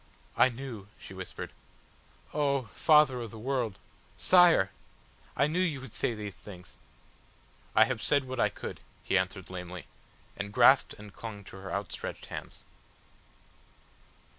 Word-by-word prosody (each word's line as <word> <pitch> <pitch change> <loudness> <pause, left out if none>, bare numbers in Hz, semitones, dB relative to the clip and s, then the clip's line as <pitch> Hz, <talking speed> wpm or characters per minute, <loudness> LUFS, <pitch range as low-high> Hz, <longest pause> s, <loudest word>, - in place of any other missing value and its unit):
"I - - +6
knew," 120 -5 -7
she - - -11
whispered. 95 -1 -7 0.8
"Oh! 140 -3 +1
Father 150 -5 +5
of 115 - -5
the 110 - -10
World 120 -3 -1 0.4
Sire! 175 - +6 0.7
I 140 - +4
knew 155 +4 0
you 165 -7 +1
would 130 -4 -10
say 120 - 0
these 105 -2 -6
things...." 90 -1 -12 1.0
"I - - +8
have - - -3
said 140 -1 +3
what 130 -1 -6
I - - +4
could," - - -7 0.2
he - - 0
answered 95 0 -1
lamely 90 -1 -7 0.5
and 100 0 -5
grasped 125 +4 +5
and 105 -1 -12
clung 105 -3 -7
to 95 - -11
her 95 0 -8
outstretched 100 -1 -4
hands. - - -8
115 Hz, 140 wpm, -30 LUFS, 95-135 Hz, 1.0 s, I